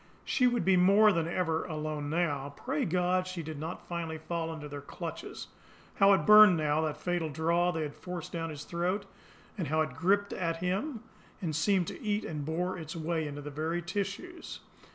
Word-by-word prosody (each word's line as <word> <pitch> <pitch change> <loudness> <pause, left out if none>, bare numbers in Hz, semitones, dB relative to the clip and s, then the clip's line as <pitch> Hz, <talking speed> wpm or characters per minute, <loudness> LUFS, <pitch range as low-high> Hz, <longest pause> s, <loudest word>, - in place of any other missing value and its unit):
She 255 -4 +3
would 245 -1 +1
be 190 -1 +5
more 200 +4 +6
than 165 -3 0
ever 165 -2 0
alone 155 -3 -3
now. 145 -4 -1
Pray 150 - -1
God 180 +1 +1
she 185 -2 -5
did 155 -1 -6
not 160 +3 -6
finally 165 -2 -3
fall 165 +1 -3
into 155 -2 -7
their 145 -1 -7
clutches! - - -7 0.5
How 195 0 +6
it 180 -6 +2
burned 210 -4 +9
now, 155 0 +1
that 155 -2 -2
fatal 175 -3 -1
draught 170 +3 +1
they 160 - -1
had 145 -1 -5
forced 180 -1 -7
down 165 -1 -3
his 150 -2 -7
throat, 180 +5 -1 0.5
and 170 - -1
how 155 +3 +2
it 155 -4 -1
gripped 200 +7 +1
at 165 -2 -1
him 205 - -2 0.4
and 165 -7 -3
seemed 185 +3 +2
to - - -9
eat 210 0 -1
and 150 -2 -4
bore 175 +4 -2
its 160 0 -7
way 160 -1 -1
into 145 0 -6
the 145 +1 -7
very 160 +4 -2
tissues! 205 - -5
170 Hz, 195 wpm, -30 LUFS, 155-185 Hz, 0.5 s, burned